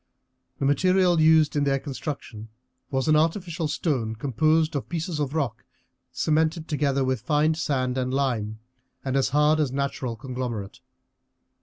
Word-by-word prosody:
The - - -2
material 180 +4 +3
used 155 -2 +5
in 145 - +2
their 140 -1 +2
construction 135 -6 -6 0.4
was 135 +1 -1
an 155 - +5
artificial 165 +1 0
stone 130 -7 -1
composed 155 +6 +1
of 140 - -3
pieces 165 -1 -3
of 145 0 -2
rock 125 -7 -2 0.5
cemented 155 +4 0
together 140 -3 0
with 130 -3 -1
fine 150 +5 +2
sand 130 -5 -1
and 130 0 -1
lime, 120 -6 -1 0.5
and 130 0 -1
as 135 -1 +2
hard 150 +2 +3
as 145 -4 +1
natural 135 -3 -2
conglomerate. 120 -5 -5
140 Hz, 145 wpm, -25 LUFS, 130-155 Hz, 0.5 s, used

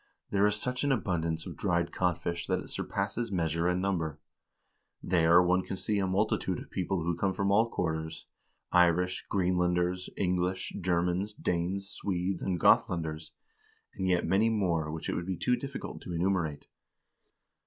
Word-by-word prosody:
There 100 +1 +4
is 105 - +1
such 125 +1 -2
an 140 - +2
abundance 85 -8 -1
of - - -7
dried 85 -1 0
codfish 85 -1 -1
that - - +1
it - - -9
surpasses 115 -2 -2
measure 85 -2 0
and 90 0 +1
number. 85 -6 -1 0.8
There 85 0 +5
one 90 +1 +3
can 95 - -5
see 105 +2 0
a 95 - +1
multitude 100 +4 0
of - - -10
people 90 -1 -1
who 85 +1 0
come 95 +2 0
from 100 -1 +1
all 110 +3 +4
quarters; 80 -5 -3 0.5
Irish, 90 +1 +3
Greenlanders, 90 -1 +1
English, 90 0 -1
Germans, 90 +3 0
Danes, 90 +3 -1
Swedes, 95 -2 -2
and 90 -2 -1
Gothlanders, 80 -1 +2 0.6
and 95 - -2
yet 90 -2 +2
many 100 +6 +3
more 85 -8 0
which 80 0 -5
it - - -1
would 85 - -3
be 95 -2 -2
too 125 +10 +2
difficult 135 +3 -6
to 90 - -6
enumerate." 85 -4 0
90 Hz, 160 wpm, -30 LUFS, 85-95 Hz, 0.8 s, There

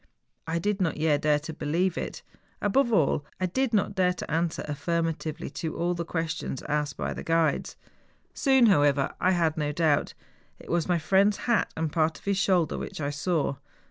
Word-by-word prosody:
I 165 +1 -1
did 205 +3 -1
not 170 -3 0
yet 150 -2 +2
dare 150 -1 +3
to 160 +2 -6
believe 170 +5 0
it; - - -5 0.4
above 235 +4 +2
all, 155 -7 +2 0.2
I 185 - +1
did 260 +7 0
not 205 -2 +1
dare 185 -2 +2
to 180 - -7
answer 165 +1 0
affirm¬ 165 +3 -1
atively 155 -1 -6
to 160 - -4
all 175 +1 0
the 170 -1 -3
questions 160 -5 -3
asked 150 -1 -2
by - - -2
the - - -6
guides. 165 -3 0 0.6
Soon, 265 -3 +4
however, 145 -8 +3
I 185 - +4
had 170 -4 +1
no 150 -1 0
doubt. 155 -2 +1 0.4
It - - -10
was 170 +1 0
my 175 - +3
friend's 195 +5 +3
hat 235 -2 +2
and 160 -1 -1
part 160 -1 +1
of - - -19
his 200 -1 +1
shoulder 180 -5 +2
which - - -6
I 145 -1 -1
saw. 145 -2 -1
165 Hz, 195 wpm, -27 LUFS, 150-185 Hz, 0.6 s, Soon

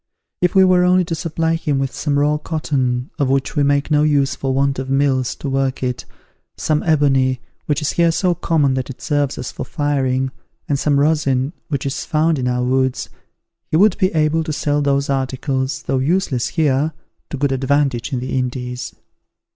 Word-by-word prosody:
If 180 +1 +1
we 190 0 +7
were 180 -1 +4
only 180 0 +3
to 165 - -4
supply 165 0 -1
him 155 -4 -1
with 135 -1 -2
some 145 -2 -1
raw 150 +1 +2
cotton, 135 -6 -2
of 140 -2 +1
which 135 +2 0
we 145 - +2
make 140 +1 +1
no 150 -1 +4
use 140 -3 +2
for 135 - -2
want 135 0 +1
of 130 0 -5
mills 135 -2 +1
to - - -6
work 135 -1 -1
it, 125 -1 -3 0.5
some 155 -1 0
ebony, 135 -5 +2 0.3
which 150 +1 0
is 150 - 0
here 170 -1 +3
so 180 +2 +1
common 150 -5 +1
that 130 0 -3
it 135 - -8
serves 145 -3 -1
us 125 - -5
for - - -6
firing, 130 -2 -1 0.4
and 140 -2 0
some 145 -1 +2
rosin, 140 -2 +1
which 140 -5 -3
is 135 - -2
found 155 -1 +1
in 125 - -1
our 125 0 0
woods, 130 0 0 0.6
he 155 - +2
would 200 +1 +5
be 185 - +2
able 155 +1 +2
to 155 - -4
sell 145 -1 0
those 140 0 +1
articles, 130 0 -2
though 135 -1 0
useless 145 -3 0
here, 150 -1 +1 0.4
to 145 - -4
good 140 0 0
advantage 135 -2 0
in 130 - -1
the 130 +1 -2
Indies." 125 0 -4
140 Hz, 195 wpm, -19 LUFS, 130-155 Hz, 0.6 s, we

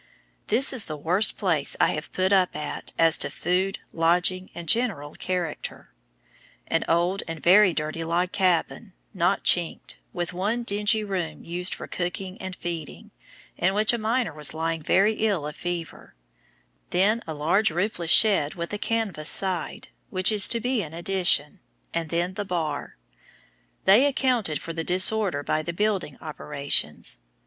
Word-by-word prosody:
This 260 +5 +3
is 245 -6 -1
the 155 - -6
worst 180 +8 +2
place 165 -8 0
I - - +4
have 155 - -5
put 185 +1 +1
up 185 -2 +2
at 150 0 -5
as 165 -1 +5
to - - -1
food, 185 +3 -1 0.2
lodging, 180 +3 +1
and 170 -1 -8
general 185 -10 0
character; 180 -4 -5 0.7
an - - 0
old 175 +4 +1
and 165 -1 -5
very 190 +3 +6
dirty 155 +1 -3
log 175 +2 -1
cabin, 180 -4 0 0.2
not - - +1
chinked, - - +1
with 175 0 -4
one 210 +7 -1
dingy 210 0 +1
room 175 -7 -4
used 180 +2 -3
for - - -8
cooking 185 +1 -5
and 190 -1 -6
feeding, 170 -4 -7 0.5
in 190 +3 +1
which 215 +2 +4
a 235 - -1
miner 220 -4 -1
was 150 0 -4
lying 165 0 -2
very 195 +7 +3
ill 205 -8 -1
of 150 - -6
fever; 175 - -6 0.7
then 205 +6 +2
a 160 - -5
large 170 +9 +2
roofless 175 0 -2
shed 195 -6 +5
with 170 +2 -5
a 205 - -3
canvas 205 -10 -1
side, 185 -3 +1 0.2
which 185 +1 +3
is 210 -2 +6
to 235 - 0
be 245 0 -1
an 160 -3 -8
addition, 175 -2 +1 0.3
and 165 -2 -2
then 175 +3 -1
the 205 - -4
bar. 165 -6 -4 0.9
They 215 +9 +6
accounted 245 - 0
for 165 - -7
the 165 0 -3
disorder 185 -3 +2
by 155 - 0
the 170 +2 -5
building 195 -7 -1
operations. 140 - -2
180 Hz, 160 wpm, -25 LUFS, 165-205 Hz, 0.9 s, very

